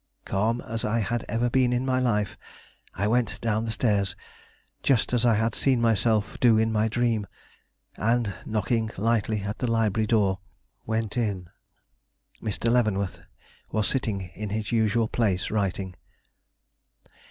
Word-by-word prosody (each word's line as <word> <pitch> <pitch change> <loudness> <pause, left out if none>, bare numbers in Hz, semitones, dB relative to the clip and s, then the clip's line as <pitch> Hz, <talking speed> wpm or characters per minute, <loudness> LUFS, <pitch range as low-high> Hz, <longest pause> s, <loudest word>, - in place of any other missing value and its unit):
Calm 115 +5 0
as 115 0 -4
I 105 +2 +1
had 115 +1 -1
ever 115 +3 +1
been 125 0 +2
in 125 +1 0
my 130 -1 +1
life, 105 -5 0 0.6
I 100 - 0
went 120 0 +1
down 110 -1 0
the - - -3
stairs 105 -4 +1 0.7
just 125 -2 +2
as 120 0 +3
I 115 - +5
had 110 +1 +1
seen 130 -3 +2
myself 110 -2 +1
do 115 -3 +5
in 110 +1 +2
my 110 0 +2
dream, 115 -2 0 0.7
and 115 -1 +1
knocking 110 +1 0
lightly 110 0 +1
at 100 +1 -4
the 125 - -1
library 110 -1 +1
door, 100 -4 +2 0.5
went 110 0 -1
in. 100 -7 -1 0.9
Mr. 115 +2 -1
Leavenworth 105 -6 +1 0.5
was 110 -1 +1
sitting 100 -9 -2
in 105 +3 -5
his 105 +2 -3
usual 110 0 +2
place 100 -6 0
writing. 95 -3 -1
110 Hz, 145 wpm, -26 LUFS, 105-115 Hz, 0.9 s, I